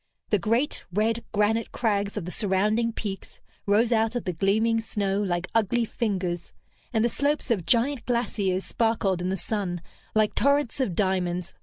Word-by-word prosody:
The 210 - +4
great, 230 - 0
red 220 +4 +1
granite 220 +2 +1
crags 205 -3 0
of 195 - -3
the 180 - -5
surrounding 215 +4 +1
peaks 205 -3 -6 0.3
rose 220 +4 +3
out 225 +1 +2
of 245 - -1
the 180 - -2
gleaming 220 +6 +2
snow 200 -2 -1
like 175 -3 -1
ugly 230 +2 +2
fingers, 185 -7 -2 0.4
and 225 -2 +2
the - - +5
slopes 285 +2 0
of 185 -7 0
giant 240 +5 +2
glaciers 205 -6 0
sparkled 220 -5 +1
in 180 - -1
the 190 - -1
sun 190 -4 -2 0.4
like 215 -1 +3
torrents 280 0 +2
of 215 -10 0
diamonds. 180 -2 0
210 Hz, 165 wpm, -26 LUFS, 190-230 Hz, 0.4 s, the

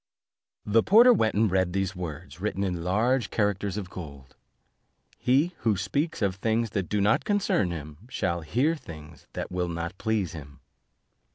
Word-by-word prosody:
The 110 +2 +4
porter 235 - +7
went 110 - +1
and 105 -1 +3
read 95 -2 +1
these 95 0 -1
words, 85 0 -7
written 100 -1 -1
in 90 -3 -2
large 110 +6 +1
characters 100 -2 0
of 95 -4 -5
gold: 70 -6 -10 0.8
"He 140 +8 +2
who 110 -4 +1
speaks 115 - -1
of 95 -1 0
things 115 +2 0
that 95 -4 -2
do 105 - 0
not 105 +2 +3
concern 200 - +1
him, 75 -3 -7
shall 85 -8 -1
hear 130 - +1
things 80 - -12
that - - -5
will 90 -1 -1
not 85 +2 -5
please 110 -6 0
him." 70 -3 -10
95 Hz, 165 wpm, -27 LUFS, 85-110 Hz, 0.8 s, porter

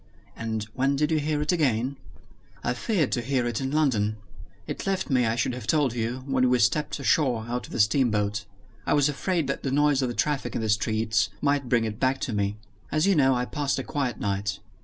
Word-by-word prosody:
"And 110 -1 -3
when 135 +2 +1
did 150 +3 +1
you 155 - +3
hear 150 0 0
it 150 - +1
again?" 135 -6 +1 0.7
"I 120 - 0
feared 165 - 0
to 120 - 0
hear 125 0 0
it 120 0 -2
in 135 - -1
London. 120 -8 +1 0.5
It - - -5
left 190 -5 -1
me, 125 -3 +3
I 110 - +1
should 120 +1 0
have 125 - -7
told 145 -6 +2
you, 120 +2 -3
when 130 -2 +2
we 125 - +4
stepped 125 +6 +1
ashore 130 -5 +2
out 125 +1 -3
of - - -15
the - - -4
steamboat. 105 -2 +2 0.4
I - - +3
was 145 0 +3
afraid 165 +3 -1
that 140 - -3
the 135 - -2
noise 145 0 +3
of 130 - +1
the 120 - -4
traffic 150 -2 -1
in - - -1
the 110 - -2
streets 110 +1 +1
might 140 -3 0
bring 115 -2 +3
it 110 -1 -5
back 130 0 +1
to 120 - -2
me. 100 0 -1 0.3
As 155 +2 +2
you 200 - +4
know, 135 -5 +4
I 125 0 0
passed 145 +1 -1
a 135 - -2
quiet 135 -3 -2
night. 100 0 -1
130 Hz, 225 wpm, -26 LUFS, 115-145 Hz, 0.7 s, we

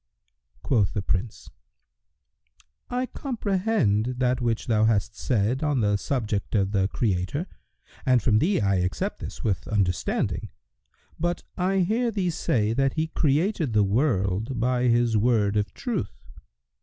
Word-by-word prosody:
Quoth 105 -7 +1
the 100 - -1
Prince, 95 +4 -3 1.4
"I 250 +1 -1
comprehend 195 - 0
that 125 0 +1
which 115 -2 -1
thou 110 -2 +2
hast 110 0 +1
said 120 +2 0
on 145 -5 +1
the 105 -1 +2
subject 105 -2 -2
of 100 -1 +1
the 95 -2 +2
Creator 100 - -1 0.6
and 130 -3 +4
from 110 -1 +3
thee 190 - +2
I 100 -3 +2
accept 90 -2 -2
this - - -7
with 100 -4 -1
understanding; 95 -4 -1 0.7
but 175 +2 -1
I 190 +1 +1
hear 225 +7 +1
thee 195 -5 -1
say 110 -8 0
that 135 +2 +1
He 160 0 -1
created 155 - +1
the 105 -1 +4
world 105 0 0
by 125 +1 +1
His 120 -2 +3
Word 105 -2 +2
of 105 -1 0
Truth. 245 -3 -4
120 Hz, 140 wpm, -25 LUFS, 105-155 Hz, 1.4 s, and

